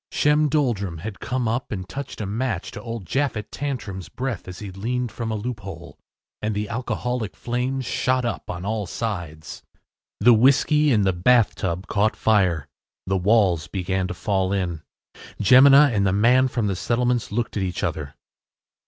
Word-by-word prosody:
Shem 150 Hz, +1 st, +3 dB
Doldrum 115 Hz, -, 0 dB
had 100 Hz, +5 st, -7 dB
come 125 Hz, 0 st, -2 dB
up 120 Hz, +4 st, -2 dB
and 95 Hz, -3 st, -4 dB
touched 140 Hz, +1 st, -6 dB
a -, -, -2 dB
match 110 Hz, -1 st, -2 dB
to 105 Hz, -, -8 dB
old 115 Hz, -3 st, -6 dB
Japhet 130 Hz, -, -2 dB
Tantrum’s 105 Hz, -10 st, -5 dB
breath 125 Hz, -9 st, -4 dB
as 90 Hz, -1 st, -8 dB
he 105 Hz, -3 st, -7 dB
leaned 120 Hz, +5 st, -3 dB
from 115 Hz, -2 st, -4 dB
a 110 Hz, -, -1 dB
loophole, 105 Hz, -3 st, -7 dB, 0.4 s
and 105 Hz, 0 st, -2 dB
the 105 Hz, 0 st, -2 dB
alcoholic 125 Hz, -2 st, -3 dB
flames 125 Hz, +2 st, -2 dB
shot 125 Hz, +1 st, 0 dB
up 120 Hz, -, -4 dB
on 90 Hz, +1 st, -5 dB
all 105 Hz, -2 st, -2 dB
sides. 85 Hz, -9 st, -5 dB, 0.6 s
The 120 Hz, +4 st, +6 dB
whiskey 140 Hz, +5 st, +4 dB
in 105 Hz, -4 st, +3 dB
the 95 Hz, -1 st, +2 dB
bathtub 95 Hz, -2 st, +2 dB
caught 105 Hz, +1 st, +1 dB
fire. 90 Hz, -9 st, +2 dB, 0.4 s
The 95 Hz, 0 st, 0 dB
walls 95 Hz, -5 st, +2 dB
began 95 Hz, +1 st, -2 dB
to 90 Hz, -, -5 dB
fall 95 Hz, +1 st, 0 dB
in. 90 Hz, -5 st, -2 dB, 0.6 s
Jemina 135 Hz, +5 st, +7 dB
and 100 Hz, -2 st, +2 dB
the -, -, +2 dB
man 125 Hz, +6 st, +4 dB
from 120 Hz, -3 st, -2 dB
the 100 Hz, -2 st, 0 dB
settlements 120 Hz, +5 st, 0 dB
looked 115 Hz, +2 st, -2 dB
at 100 Hz, -, -1 dB
each 95 Hz, 0 st, -3 dB
other. 75 Hz, -6 st, -3 dB
110 Hz, 170 wpm, -23 LUFS, 95-125 Hz, 0.6 s, Jemina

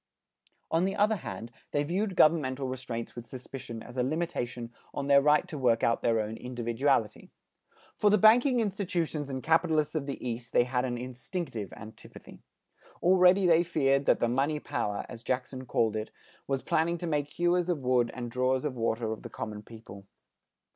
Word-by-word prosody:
On 165 Hz, +3 st, +2 dB
the 195 Hz, -, -1 dB
other 215 Hz, +1 st, +2 dB
hand, 115 Hz, -9 st, -7 dB, 0.2 s
they 145 Hz, -, 0 dB
viewed 185 Hz, +5 st, -1 dB
governmental 140 Hz, -5 st, +3 dB
restraints 125 Hz, -3 st, -5 dB
with 120 Hz, -1 st, -8 dB
suspicion 125 Hz, -2 st, -8 dB
as 125 Hz, -, -11 dB
a 125 Hz, -, +2 dB
limitation 125 Hz, -6 st, -3 dB, 0.2 s
on 140 Hz, -, -2 dB
their 140 Hz, 0 st, +6 dB
right 150 Hz, +1 st, +3 dB
to 150 Hz, -, -6 dB
work 120 Hz, -3 st, +2 dB
out 115 Hz, -, +2 dB
their 115 Hz, -1 st, +2 dB
own 110 Hz, +1 st, -3 dB
individuality. 120 Hz, -1 st, -1 dB, 0.7 s
For 210 Hz, -, +4 dB
the 210 Hz, -, +5 dB
banking 240 Hz, +5 st, +5 dB
institutions 175 Hz, -8 st, -2 dB
and 130 Hz, -1 st, -4 dB
capitalists 160 Hz, -2 st, +2 dB
of 150 Hz, -3 st, -2 dB
the 140 Hz, -, -3 dB
East 120 Hz, 0 st, -5 dB
they -, -, +5 dB
had 125 Hz, +1 st, -1 dB
an 120 Hz, -1 st, -2 dB
instinctive 125 Hz, -, -5 dB
antipathy. 110 Hz, +1 st, -12 dB, 0.6 s
Already 185 Hz, +1 st, +5 dB
they 170 Hz, -1 st, +5 dB
feared 140 Hz, -5 st, +1 dB
that -, -, +3 dB
the 120 Hz, -, +2 dB
"money 140 Hz, +5 st, 0 dB
power" 105 Hz, -7 st, -3 dB
as 115 Hz, -2 st, -9 dB
Jackson 130 Hz, +1 st, -3 dB
called 110 Hz, -2 st, +1 dB
it, 110 Hz, 0 st, -3 dB, 0.4 s
was 135 Hz, -1 st, -1 dB
planning 170 Hz, +2 st, +1 dB
to 175 Hz, -, -5 dB
make 150 Hz, -3 st, 0 dB
hewers 175 Hz, +3 st, +1 dB
of 175 Hz, -, +1 dB
wood 125 Hz, -2 st, +2 dB
and 120 Hz, -2 st, -5 dB
drawers 130 Hz, +2 st, +1 dB
of 145 Hz, -, -1 dB
water 115 Hz, -1 st, -1 dB
of 110 Hz, -, -5 dB
the -, -, -8 dB
common 105 Hz, -1 st, -6 dB
people. 105 Hz, -3 st, -12 dB
135 Hz, 180 wpm, -29 LUFS, 120-165 Hz, 0.7 s, their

